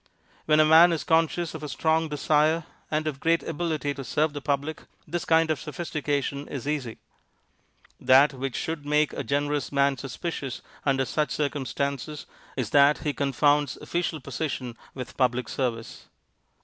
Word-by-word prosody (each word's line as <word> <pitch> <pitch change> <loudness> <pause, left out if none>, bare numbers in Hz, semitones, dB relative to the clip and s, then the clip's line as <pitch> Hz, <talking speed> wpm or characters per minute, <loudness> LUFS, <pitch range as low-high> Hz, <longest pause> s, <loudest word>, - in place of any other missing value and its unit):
When 155 0 +5
a 155 - +7
man 165 +3 +7
is 165 - -1
conscious 165 +1 +1
of 160 - -7
a 150 - -5
strong 160 +1 +1
desire 155 +2 +2 0.3
and 155 0 -1
of 150 -3 -3
great 165 +2 +2
ability 160 -3 -2
to 140 - -7
serve 150 +5 0
the 145 - -5
public, 145 +2 -2 0.3
this 170 +2 -3
kind 160 0 +3
of 155 - -1
sophistication 145 -3 -3
is 140 0 -6
easy. 140 -7 -2 1.0
That 140 +3 +5
which 135 -1 -4
should 160 -2 -3
make 150 +1 +2
a - - -3
generous 145 +1 -1
man 140 -2 +2
suspicious 135 -1 -5 0.2
under 135 -1 +2
such 150 +6 -1
circumstances 140 0 -3 0.3
is 120 -5 -2
that 145 +1 +5
he 150 - 0
confounds 145 0 +2
official 170 -2 -2
position 130 -8 -4 0.2
with 125 -2 -7
public 125 -2 +1
service. 115 -4 -4
145 Hz, 155 wpm, -26 LUFS, 135-155 Hz, 1.0 s, a